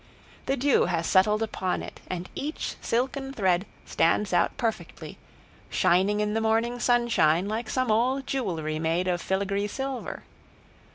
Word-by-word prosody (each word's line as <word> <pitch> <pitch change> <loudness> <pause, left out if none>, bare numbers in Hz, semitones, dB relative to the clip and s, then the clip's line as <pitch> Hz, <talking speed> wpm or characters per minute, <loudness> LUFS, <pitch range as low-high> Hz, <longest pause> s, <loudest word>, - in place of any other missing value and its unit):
The 270 - +1
dew 275 +1 +3
has 170 -1 -1
settled 210 +5 +3
upon 185 -4 -2
it - - -9
and 180 0 -4
each 300 +3 -4
silken 270 +3 -1
thread 190 -4 +1 0.2
stands 185 +4 +1
out 175 - +2
perfectly, 230 -5 -4 0.5
shining 190 +3 +2
in 210 0 0
the 225 - 0
morning 225 +2 +1
sunshine 235 -9 +3
like 220 +2 -3
some 255 -3 0
old 255 +5 +1
jewelry 165 - -2
made 165 +3 0
of 175 -1 0
filagree 200 +1 -1
silver. 270 +3 -5
210 Hz, 145 wpm, -26 LUFS, 180-245 Hz, 0.5 s, dew